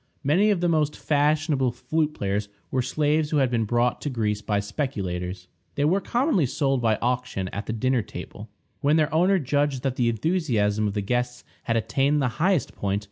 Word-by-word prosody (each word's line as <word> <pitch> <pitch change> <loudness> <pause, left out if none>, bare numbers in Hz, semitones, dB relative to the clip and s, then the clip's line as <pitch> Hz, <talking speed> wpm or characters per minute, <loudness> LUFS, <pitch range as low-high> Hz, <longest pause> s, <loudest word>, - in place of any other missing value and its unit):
Many 175 +10 +3
of 200 -5 +1
the 175 - +2
most 155 -3 +1
fashionable 150 -3 +1
flute 155 +4 -1
players 100 +1 -2 0.2
were 130 - +1
slaves 150 +4 +1
who 150 - +1
had 135 -3 +2
been 115 -2 +1
brought 120 +2 +1
to 145 - -2
Greece 105 -5 -1
by 105 -1 0
speculators. 95 -6 -4 0.3
They 145 - +1
were 185 +6 +2
commonly 240 - +1
sold 135 0 0
by 110 -2 +3
auction 125 -6 -1
at 100 +2 -6
the 110 - -2
dinner 130 +2 +1
table, - - -9 0.3
when 145 +2 +3
their 155 -1 +2
owner 185 +5 +4
judged 145 -3 0
that 135 -2 -1
the 120 -2 +2
enthusiasm 115 - 0
of 100 - -3
the 105 - 0
guests 125 +3 -2 0.2
had 115 -1 +1
attained 135 +7 +1
the 135 -3 +1
highest 180 -6 +2
point. 100 0 -1
130 Hz, 190 wpm, -25 LUFS, 110-150 Hz, 0.3 s, owner